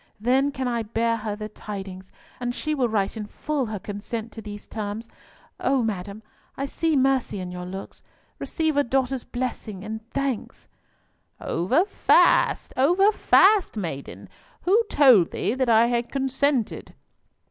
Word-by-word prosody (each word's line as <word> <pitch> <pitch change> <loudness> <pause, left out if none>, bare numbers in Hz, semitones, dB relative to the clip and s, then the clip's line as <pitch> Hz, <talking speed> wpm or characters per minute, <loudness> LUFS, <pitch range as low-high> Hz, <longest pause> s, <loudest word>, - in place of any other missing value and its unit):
Then 260 +5 +2
can 260 -2 -3
I 235 -1 0
bear 230 +1 0
her 215 -1 -4
the 215 0 -6
tidings, 195 -3 -8 0.3
and 245 0 -3
she 310 - -2
will 255 -5 +1
write 200 -3 0
in 210 -2 -5
full 290 +2 -2
her 215 -1 -4
consent 215 +3 -6
to 225 - -9
these 205 -1 -9
terms. 215 +1 -5 0.5
O 265 -1 +1
madam, 205 0 -4 0.3
I 275 - -2
see 320 +3 0
mercy 265 -6 +1
in 180 -1 -5
your 180 0 -6
looks. 190 +2 -8 0.4
Receive 315 -2 -1
a 285 - +4
daughter's 265 0 0
blessing 235 -6 -5
and 220 +1 -5
thanks!" 275 -4 -3 0.7
"Over 255 - +1
fast, - - +3
over 355 +10 +4
fast, 400 - +4
maiden. 160 -9 -6 0.4
Who 400 +6 +4
told 250 - +6
thee - - -1
that 260 -1 0
I 225 0 +6
had 240 0 -1
consented?" 270 -2 -1
235 Hz, 150 wpm, -24 LUFS, 210-270 Hz, 0.7 s, told